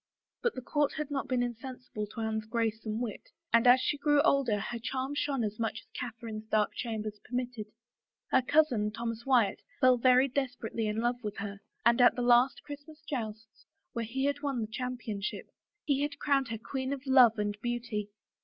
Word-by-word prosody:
But 480 - 0
the 255 - -6
court 290 +2 +1
had 300 -2 -4
not 275 -2 -2
been 250 -1 +1
insensible 245 -2 -5
to 225 +2 -7
Anne's 220 -1 -2
grace 225 -1 -1
and 215 +1 -1
wit, 235 -4 -5 0.2
and 230 +1 +5
as 250 +1 +8
she 290 - 0
grew 295 0 +4
older 255 -9 +3
her 230 +3 -4
charm 260 +4 -3
shone 285 -4 0
as 210 0 -3
much 225 -1 -2
as - - -29
Catherine's 225 -3 -6
dark 215 -1 +2
chambers 215 -3 -4
permitted. 245 -3 -4 0.6
Her 260 - +5
cousin, 255 -6 +3
Thomas 230 +2 -5
Wyatt, 235 -7 +3 0.2
fell 255 -1 +6
very 255 +2 +5
desperately 250 -4 -2
in 210 +1 -1
love 240 +1 0
with 210 -1 -4
her, 200 0 -5 0.3
and 235 +1 +5
at 245 - +7
the 245 - -1
last 245 +2 +4
Christmas 295 +2 -10
jousts, 220 -4 -6 0.3
where 235 - -2
he 265 +5 0
won 275 -5 -1
the 215 - -2
cham 250 +2 -3
pionship, 210 -4 -4 0.4
he 280 -2 +2
had 290 0 -2
crowned 275 -2 +2
her 225 0 -4
Queen 260 +4 -3
of 275 0 -7
Love 255 -4 +6
and 205 0 -1
Beauty. 235 -4 -3
240 Hz, 190 wpm, -31 LUFS, 220-265 Hz, 0.6 s, as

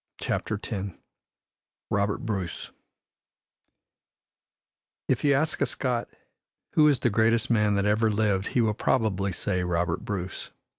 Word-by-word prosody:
CHAPTER 110 - -2
X 100 -4 -4 1.0
ROBERT 100 0 0
BRUCE 95 -6 -4 2.4
If - - +1
you 145 -1 +4
ask 155 +3 0
a - - +3
Scot 125 -3 -2 0.6
who 150 -1 +5
is 140 -4 +3
the 120 - +2
greatest 115 +2 +2
man 105 -3 +3
that 100 0 +1
ever 110 +2 +3
lived 105 -2 +1
he 125 - +1
will 110 -2 +2
probably 100 -4 0
say 90 0 -1
Robert 90 +2 -1
Bruce. 100 -5 -4
105 Hz, 130 wpm, -27 LUFS, 100-115 Hz, 2.4 s, who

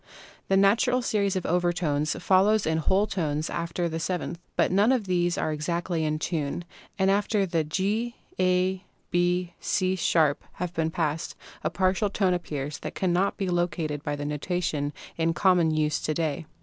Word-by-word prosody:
The 195 - +3
natural 230 +6 +3
series 200 -5 +1
of 185 - -2
overtones 170 -4 +1
follows 195 +3 +4
in 160 0 +1
whole 190 +6 +2
tones 155 -6 -2
after 170 +1 -2
the 165 0 -3
seventh. 170 -1 -3 0.2
But - - +2
none 205 +6 +4
of 250 -6 +1
these 175 -2 +1
are 155 - 0
exactly 170 +2 -1
in 155 0 0
tune, 155 0 -2 0.3
and 190 -1 +3
after 205 0 +2
the 170 -3 0
G" 205 +9 -1 0.2
A" 185 0 +2 0.3
B" 175 0 +1
C'" 185 -1 0
# 160 -4 +1
have 180 -1 -4
been 160 -2 0
passed 160 -1 -2 0.3
a - - +1
partial 190 +2 +1
tone 190 -2 +1
appears 150 -5 -4
which - - -5
cannot 185 +1 +1
be 195 - -2
located 175 -4 -1
by 145 0 -2
the 145 0 -5
notation 150 -1 -2 0.3
in 165 0 +1
common 180 -4 +4
use 155 -1 +1
to 155 - -2
day. 155 -1 -2
175 Hz, 170 wpm, -26 LUFS, 155-190 Hz, 0.3 s, follows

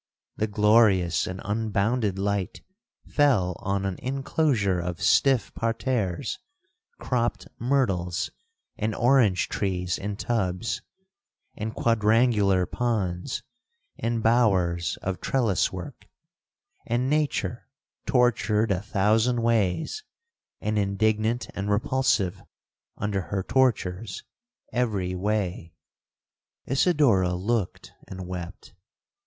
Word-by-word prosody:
The 110 - 0
glorious 105 -4 +3
and 95 +1 -5
unbounded 105 0 0
light 100 -1 -2 0.4
fell 110 - +2
on 100 0 -1
an 95 -2 -2
inclosure 130 - 0
of 85 -1 -4
stiff 135 -4 +3
parterres, 115 -5 -2 0.6
cropped 120 -1 -1
myrtles 100 -10 0 0.5
and 110 +1 -1
orange 120 -7 +3
trees 90 -2 -2
in 100 +1 -4
tubs, 110 -1 -2 0.7
and 110 +1 -5
quadrangular 110 -4 +3
ponds, 105 -1 -2 0.5
and 115 -1 -2
bowers 95 -8 +2
of 95 -1 -3
trellis 115 -8 +1
work, 90 -3 -8 0.8
and 120 +2 0
nature 145 -5 -1 0.4
tortured 115 -3 +2
a 95 -1 0
thousand 110 +4 +1
ways, 115 - 0 0.6
and 105 0 -1
indignant 110 +4 0
and 100 +1 -3
repulsive 105 -3 +1 0.6
under 100 -1 -1
her 95 -2 -1
tortures 110 -6 0 0.5
every 105 -7 0
way. 90 -4 -2 0.9
'Isidora 130 - +3
looked 100 +2 -2
and 95 -1 -7
wept. 90 -1 -7
105 Hz, 95 wpm, -26 LUFS, 95-120 Hz, 0.9 s, glorious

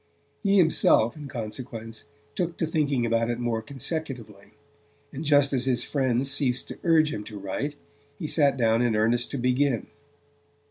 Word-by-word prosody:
He 200 -1 +3
himself, 160 - +4
in 150 -2 -8
consequence, 115 -2 -6 0.3
took 175 -2 -2
to 165 - 0
thinking 145 -6 0
about 115 0 +1
it 120 - -1
more 120 -2 -1
consecutively; 130 - -6 0.6
and 145 - -5
just 145 -2 +3
as 125 -1 +1
his 130 -2 +1
friends 135 -1 0
ceased 135 -3 0
to - - -8
urge 160 -3 +4
him 105 - -4
to 105 - -8
write, 100 +10 -4 0.4
he - - -5
sat 145 -3 +2
down 115 -1 +3
in 120 -3 +2
earnest 115 +3 +1
to 140 - -4
begin. 125 -1 +1
130 Hz, 165 wpm, -26 LUFS, 115-145 Hz, 0.6 s, himself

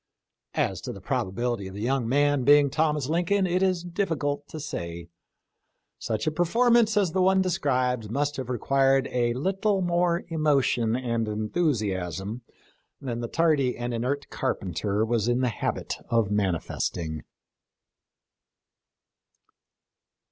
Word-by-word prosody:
As - - 0
to - - -5
the - - -9
probability 115 +1 -2
of 95 - -9
the 100 - -6
young 125 -1 0
man 145 0 +2
being 145 +1 +5
Thomas 150 -2 +1
Lincoln 175 +5 +1
it 180 +1 0
is 185 -2 +1
diffi 175 -3 -1
cult 145 0 -2
to 155 - -8
say; 85 - -6 0.9
such 110 -1 -2
a 155 - +1
performance 225 +6 +3
as 195 -5 +2
the 185 - +1
one 190 +1 +4
de 185 - 0
scribed 125 - 0
must 145 +5 -1
have 130 -2 -5
required 135 +2 +2
a 120 -1 +1
little 195 - 0
more 175 0 +1
emotion 140 -8 +2
and 115 -3 -1
enthusiasm 105 - -2 0.6
than 120 -3 -4
the 120 - -3
tardy 150 -4 +1
and 120 0 -3
inert 130 +5 -2
carpenter 100 -3 -1
was 115 -1 0
in 120 +1 +2
the 125 - +2
habit 110 - -3
of 115 -3 +2
manifesting. 85 -4 -2
135 Hz, 135 wpm, -26 LUFS, 115-165 Hz, 0.9 s, being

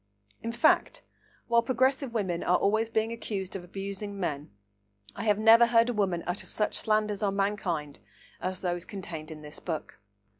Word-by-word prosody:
In 230 - -3
fact, - - +2 0.4
while 235 0 +4
progressive 260 +2 +1
women 185 -7 -1
are 180 - +3
always 220 +3 +1
being 225 0 0
accused 205 -5 -4
of 190 - -5
abusing 200 +2 -6
men, 150 -5 -3 0.7
I - - -4
have 210 -2 +3
never 225 +2 +7
heard 230 0 +4
a - - 0
woman 190 -5 0
utter 175 +2 -3
such 210 - 0
slanders 215 -1 +1
on 200 -2 0
mankind 190 -7 -1 0.4
as 185 0 -3
those 175 -2 -1
contained 170 -6 -7
in 155 -1 -9
this 150 0 -9
book. 160 - -5
200 Hz, 165 wpm, -29 LUFS, 175-225 Hz, 0.7 s, never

